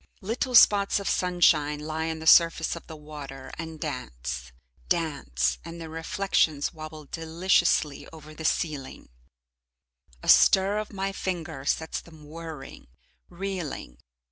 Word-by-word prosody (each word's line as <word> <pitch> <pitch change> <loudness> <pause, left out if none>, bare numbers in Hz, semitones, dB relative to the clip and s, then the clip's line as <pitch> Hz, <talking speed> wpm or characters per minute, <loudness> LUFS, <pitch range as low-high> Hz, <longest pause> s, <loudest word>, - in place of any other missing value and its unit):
Little 240 +5 -2
spots 205 -3 +6
of 200 - -5
sunshine 160 -5 +3
lie 160 +1 -3
on 160 - -3
the 160 - -8
surface 165 0 +5
of 170 - -10
the 160 - -8
water 145 -3 -9
and 160 -1 -6
dance, 65 - -5 0.4
dance, 140 - 0
and 170 +1 -8
their 165 -1 -7
reflections 165 -2 0
wobble 155 -1 -9
deliciously 165 -2 +1
over 155 -1 -12
the 160 - -9
ceiling; 150 -4 -2 1.1
a - - -8
stir 195 +2 +6
of 215 - -5
my 195 -1 -2
finger 170 -7 -4
sets 160 +2 -1
them 160 -3 -15
whirring, 160 -3 -9 0.4
reeling. 175 - -5
160 Hz, 130 wpm, -27 LUFS, 150-175 Hz, 1.1 s, spots